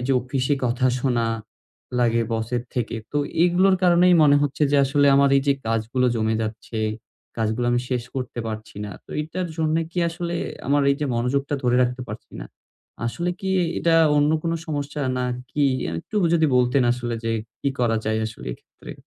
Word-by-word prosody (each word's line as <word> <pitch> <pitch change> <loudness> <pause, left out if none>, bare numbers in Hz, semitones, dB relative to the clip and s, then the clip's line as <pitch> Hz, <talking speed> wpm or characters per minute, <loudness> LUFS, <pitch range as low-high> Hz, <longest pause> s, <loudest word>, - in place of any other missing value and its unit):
এইযে 130 +2 0
অফিসে 130 +2 0
কথা 125 +1 +1
শোনা 120 -3 +1 0.7
লাগে 115 -1 +2
বসের 115 +2 -1
থেকে। 120 -2 -2 0.2
তো 145 - +1 0.3
এগুলোর 185 +2 +4
কারণেই 180 0 +5
মনে 145 -1 +6
হচ্ছে 145 +1 -1
যে - - +5
আসলে 145 +1 +2
আমার 140 0 +4
এইযে 140 +1 +2
কাজগুলো 115 +3 0
জমে 110 0 +1
যাচ্ছে. 110 +1 -5 0.6
কাজগুলো 115 +2 0
আমি 120 - +2
শেষ 125 -2 -1
করতে 125 -2 -4
পারছি 110 -1 -7
না। 105 - -6 0.2
তো - - -16
এটার 175 +3 -4
জন্য 160 0 +1
কি 175 - -5
আসলেএ 170 0 -3 0.3
আমার 145 0 +3
এইযে 145 +1 -2
মনোযোগটা 135 +5 0
ধরে 125 0 +2
রাখতে 125 +1 -1
পারছি 105 +2 -9
না? - - -7 0.6
আসলে 170 +9 -2
কি 190 - -3
এ - - +1
এটা 165 -1 +2 0.2
অন্য 145 +1 +3
কোন 165 - -1
সমস্যা, 145 -1 -3 0.2
নাকি? 125 +3 -2 0.3
আ - - -6
একটু 215 - -7 0.2
যদি 160 -2 +4
বলতেন 125 +2 +3
আসলে 120 -1 -3
যে, 115 - 0 0.3
কি 140 - 0
করা 115 -2 +2
যায় 110 0 +1
আসলে 110 - -9
এক্ষেত্রে? - - -13
130 Hz, 175 wpm, -23 LUFS, 120-150 Hz, 0.7 s, মনে